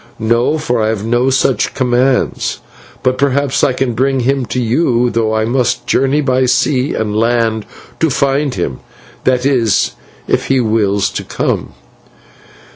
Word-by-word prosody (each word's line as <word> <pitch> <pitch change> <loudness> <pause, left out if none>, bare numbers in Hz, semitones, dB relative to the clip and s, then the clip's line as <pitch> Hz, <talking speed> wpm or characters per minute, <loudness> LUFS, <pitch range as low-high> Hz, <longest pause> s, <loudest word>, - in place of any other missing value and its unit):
"'No, 115 +7 +1
for 125 -7 -1
I 110 - +1
have 110 -1 -2
no 120 +3 +1
such 135 -1 +1
commands; 130 0 0 0.4
but 130 0 +1
perhaps 140 0 +1
I - - +4
can 130 -1 -1
bring 135 +2 +1
him 135 0 0
to 125 - -2
you, 120 0 +1
though 110 -1 0
I 110 0 +1
must 120 0 0
journey 135 +4 +1
by 130 -2 +1
sea 130 +1 +1
and 105 -1 -2
land 115 -1 0 0.3
to 160 - +2
find 140 0 0
him 80 -8 -3 0.5
that 130 0 +2
is, 120 -7 +2 0.4
if - - 0
he 135 -1 +2
wills 105 -4 +1
to - - -4
come. - - -3
125 Hz, 155 wpm, -15 LUFS, 115-135 Hz, 0.5 s, I